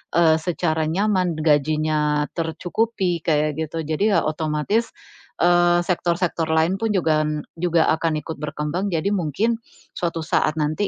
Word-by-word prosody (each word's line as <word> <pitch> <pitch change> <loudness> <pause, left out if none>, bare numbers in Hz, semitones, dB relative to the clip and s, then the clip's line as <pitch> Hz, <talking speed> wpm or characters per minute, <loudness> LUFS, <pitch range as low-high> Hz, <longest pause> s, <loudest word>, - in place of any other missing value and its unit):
eee, 160 -2 +5
secara 160 -2 -1
nyaman, 185 -1 +1
gajinya 150 0 +1
tercukupi, 175 +3 -1
kayak 150 -1 +1
gitu. 160 +1 -3
Jadi 175 +7 +1
ya, - - +3
otomatis, 155 +8 -1 0.5
eee, 175 0 +4
sektor-sektor 175 -2 -1
lain 160 +4 +1
pun 225 -1 0
juga 155 -4 +2 0.3
juga 170 -2 +2
akan 160 -1 -1
ikut 160 - -6
berkembang, 150 +5 -3
jadi 170 +4 0
mungkin 205 - 0 0.4
suatu 165 -2 -2
saat 155 -1 +1
nanti 155 +7 0
165 Hz, 130 wpm, -22 LUFS, 155-180 Hz, 0.5 s, eee